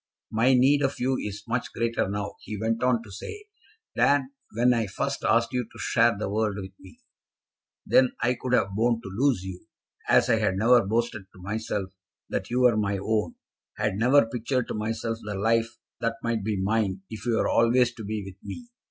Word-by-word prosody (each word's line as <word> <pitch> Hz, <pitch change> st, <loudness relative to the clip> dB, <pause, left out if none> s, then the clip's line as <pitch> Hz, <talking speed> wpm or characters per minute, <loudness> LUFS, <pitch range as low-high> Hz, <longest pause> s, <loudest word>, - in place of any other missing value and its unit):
"My 120 Hz, +4 st, +4 dB
need 135 Hz, +3 st, +4 dB
of 135 Hz, 0 st, -1 dB
you 130 Hz, +1 st, +1 dB
is 105 Hz, 0 st, -5 dB
much 120 Hz, +1 st, -2 dB
greater 115 Hz, -3 st, 0 dB
now," 100 Hz, 0 st, -3 dB
he 105 Hz, -, -6 dB
went 115 Hz, +2 st, -1 dB
on 125 Hz, -2 st, +2 dB
to 105 Hz, -, -13 dB
say, 415 Hz, -, -8 dB, 0.5 s
"than 140 Hz, -1 st, +3 dB, 0.2 s
when 120 Hz, +3 st, +3 dB
I 115 Hz, -3 st, 0 dB
first 95 Hz, -, -3 dB
asked 115 Hz, +2 st, +2 dB
you 125 Hz, -1 st, 0 dB
to -, -, -14 dB
share 115 Hz, -2 st, +2 dB
the 105 Hz, -, -3 dB
world 105 Hz, 0 st, 0 dB
with 95 Hz, -2 st, -6 dB
me. 95 Hz, -, -16 dB, 0.9 s
Then 130 Hz, -1 st, +4 dB
I 120 Hz, +1 st, +2 dB
could 125 Hz, 0 st, -4 dB
have 100 Hz, -5 st, +3 dB
borne 115 Hz, +2 st, +2 dB
to 95 Hz, -, -7 dB
lose 125 Hz, -5 st, +2 dB
you, 95 Hz, -1 st, -8 dB, 0.4 s
as -, -, +5 dB
I -, -, +3 dB
had 95 Hz, -, +1 dB
never 115 Hz, +4 st, +5 dB
boasted 110 Hz, -1 st, -1 dB
to 90 Hz, -, -15 dB
myself 105 Hz, -1 st, -3 dB, 0.4 s
that -, -, -3 dB
you 125 Hz, +1 st, +1 dB
were 120 Hz, -3 st, +5 dB
my 100 Hz, -2 st, 0 dB
own, 105 Hz, +2 st, -1 dB, 0.4 s
had 105 Hz, -, 0 dB
never 125 Hz, +6 st, +4 dB
pictured 120 Hz, +2 st, -2 dB
to -, -, -2 dB
myself 115 Hz, +1 st, -3 dB
the 105 Hz, -1 st, -5 dB
life 115 Hz, +3 st, +1 dB, 0.2 s
that 115 Hz, -1 st, -1 dB
might 115 Hz, -3 st, -1 dB
be 105 Hz, -1 st, -1 dB
mine 95 Hz, -1 st, 0 dB
if 110 Hz, +1 st, -7 dB
you 115 Hz, -, +2 dB
were -, -, +1 dB
always 120 Hz, +1 st, +3 dB
to 110 Hz, -, -9 dB
be 105 Hz, 0 st, -3 dB
with 95 Hz, -1 st, -12 dB
me. 245 Hz, -1 st, -8 dB
115 Hz, 205 wpm, -26 LUFS, 105-125 Hz, 0.9 s, as